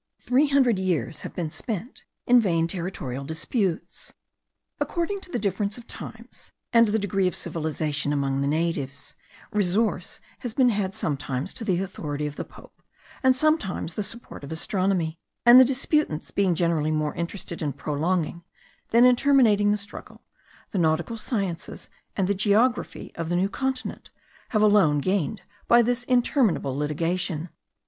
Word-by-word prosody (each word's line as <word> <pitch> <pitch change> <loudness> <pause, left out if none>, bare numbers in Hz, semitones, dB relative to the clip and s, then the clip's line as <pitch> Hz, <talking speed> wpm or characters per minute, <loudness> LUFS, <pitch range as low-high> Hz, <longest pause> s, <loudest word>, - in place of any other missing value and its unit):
Three 270 +4 +3
hundred 260 -7 +3
years 170 -7 -1
have - - -8
been 165 -4 -3
spent 225 - -5 0.2
in 245 0 +6
vain 170 -7 +2
territorial 170 -7 -4
disputes. 165 - -3 0.6
According 380 +3 -2
to 360 - -11
the - - -1
difference 200 +1 -1
of 240 - -11
times, - - -10 0.2
and 230 -1 +6
the 210 +1 +1
degree 195 -2 +1
of 180 - -2
civilization 155 -3 -2
among 140 -1 0
the 140 - 0
natives, 145 -3 -2 0.4
resource 210 +2 0 0.2
has 245 -4 -5
been 255 -2 +5
had 200 -3 -1
sometimes 140 +2 -3
to 245 - -8
the 185 -5 +1
authority 150 -6 -4
of 145 -1 -4
the - - -4
Pope, - - -17 0.4
and 260 -2 +4
sometimes 260 - 0
the 210 - -2
support 230 -5 -7
of 140 - -8
astronomy; 170 -1 -1 0.3
and 240 +1 +10
the - - +10
disputants 270 - 0
being 190 -3 +2
generally 165 -3 +1
more 155 -1 0
interested 170 0 -5
in 150 -2 -1
prolonging 160 +4 -2 0.5
than 235 +2 +6
in 250 0 +7
terminating 240 -7 +4
the 210 - +3
struggle, 200 0 -10 0.5
the 195 - -1
nautical 165 +6 +1
sciences 195 -7 -4 0.3
and 190 -2 +1
the 200 - +2
geography 215 +5 +1
of 165 -1 -4
the 175 - 0
New 190 +3 +2
Continent, 265 +2 -3 0.4
have 215 -2 +2
alone 200 -8 +5
gained 185 +4 -1 0.2
by 240 0 +6
this 245 +1 0
interminable 245 - +2
litigation. 165 +3 -1
190 Hz, 155 wpm, -25 LUFS, 160-230 Hz, 0.6 s, and